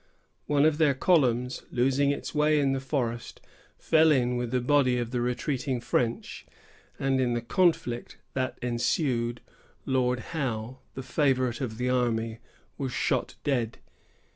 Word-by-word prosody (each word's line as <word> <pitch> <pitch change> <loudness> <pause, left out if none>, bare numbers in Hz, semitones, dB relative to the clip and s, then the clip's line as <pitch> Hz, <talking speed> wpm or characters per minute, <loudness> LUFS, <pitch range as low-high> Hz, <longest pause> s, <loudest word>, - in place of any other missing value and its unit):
One 145 0 +3
of 155 0 +2
their 145 -4 +4
columns, 125 -6 +2
losing 135 +3 +2
its 140 - -3
way 150 0 +3
in 140 -1 +2
the 135 - -1
forest, 125 -4 -3 0.4
fell 160 0 +4
in 125 -3 +2
with 120 -1 -2
a 130 - +2
body 130 -1 +3
of 120 -1 -3
the 125 -1 -1
retreating 125 +1 -1
French; 120 -1 -2 0.5
and 135 -1 +1
in 120 -2 +1
the 120 - -1
conflict 155 -6 0 0.2
that 130 -1 -2
ensued, 120 0 0 0.4
Lord 125 -1 +1
Howe, 130 -4 -3 0.2
the 135 - -5
favorite 130 -2 +1
of 110 -4 -4
the 125 +1 0
army, 115 -2 0 0.4
was 135 -2 -2
shot - - -1
dead. 120 -5 0
125 Hz, 145 wpm, -27 LUFS, 120-140 Hz, 0.5 s, their